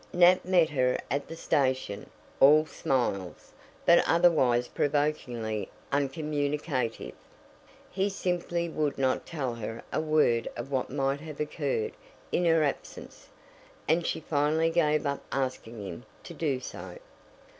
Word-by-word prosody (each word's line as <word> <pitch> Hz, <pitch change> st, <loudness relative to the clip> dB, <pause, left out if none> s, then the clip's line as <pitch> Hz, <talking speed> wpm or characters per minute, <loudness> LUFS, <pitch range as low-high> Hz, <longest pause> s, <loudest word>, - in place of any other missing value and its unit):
Nat 180 Hz, +1 st, +6 dB
met 180 Hz, -3 st, +4 dB
her 130 Hz, -3 st, +1 dB
at 140 Hz, +1 st, -1 dB
the 165 Hz, -, -7 dB
station, 130 Hz, -9 st, -1 dB, 0.3 s
all 150 Hz, +3 st, +7 dB
smiles, 100 Hz, -, -2 dB, 0.3 s
but 170 Hz, -, +6 dB
otherwise 135 Hz, -8 st, +4 dB
provokingly 125 Hz, -7 st, -1 dB, 0.2 s
uncommunicative. 145 Hz, -3 st, -1 dB, 0.8 s
He 195 Hz, +2 st, 0 dB
simply 175 Hz, -3 st, -2 dB
would 155 Hz, -3 st, -1 dB
not 130 Hz, -1 st, 0 dB
tell 135 Hz, -7 st, -3 dB
her 115 Hz, 0 st, -6 dB
a -, -, +1 dB
word 150 Hz, -7 st, +2 dB
of 140 Hz, -, -6 dB
what 130 Hz, -2 st, -1 dB
might 135 Hz, +1 st, 0 dB
have 155 Hz, -2 st, -9 dB
occurred 445 Hz, -, -1 dB, 0.4 s
in 175 Hz, -, +1 dB
her 165 Hz, -2 st, +4 dB
absence, 145 Hz, -, -5 dB, 0.6 s
and 165 Hz, +2 st, +2 dB
she -, -, -1 dB
finally 155 Hz, +2 st, +1 dB
gave 155 Hz, -3 st, +2 dB
up 140 Hz, 0 st, -1 dB
asking 125 Hz, -5 st, -3 dB
him 95 Hz, +5 st, -7 dB, 0.2 s
to 170 Hz, -, -9 dB
do 145 Hz, -4 st, -1 dB
so. 130 Hz, -, -8 dB
145 Hz, 130 wpm, -28 LUFS, 130-165 Hz, 0.8 s, all